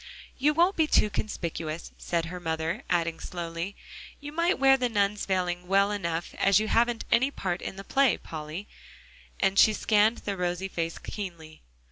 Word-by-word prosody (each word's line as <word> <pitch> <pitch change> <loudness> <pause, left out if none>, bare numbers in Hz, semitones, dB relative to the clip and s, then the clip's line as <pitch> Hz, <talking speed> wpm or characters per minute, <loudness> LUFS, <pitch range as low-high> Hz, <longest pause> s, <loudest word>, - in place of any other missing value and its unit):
"You 295 +3 +3
won't 350 +4 +4
be 320 -1 +2
too 210 - +3
conspicuous," 170 -6 -4
said 170 -1 -2
her 180 +2 -6
mother; 160 -1 -2
adding 170 -1 0
slowly, 170 +2 -5 0.4
"you 290 0 -8
might 335 +4 +1
wear 270 0 +6
the 250 -2 0
nun's 205 -1 0
veiling 180 -2 -1
well 200 +2 +3
enough 170 -4 -3
as 195 0 +5
you 215 0 -2
haven't 235 0 +2
any 260 +4 +4
part 185 -9 -3
in - - -5
the 195 - -8
play, 270 0 +3
Polly," 160 +5 -7 0.7
and 195 0 +2
she 215 - +7
scanned 215 +2 +3
the 200 - -1
rosy 180 +1 -2
face 165 -2 -3
keenly. 170 -6 -8
195 Hz, 170 wpm, -28 LUFS, 170-220 Hz, 0.7 s, she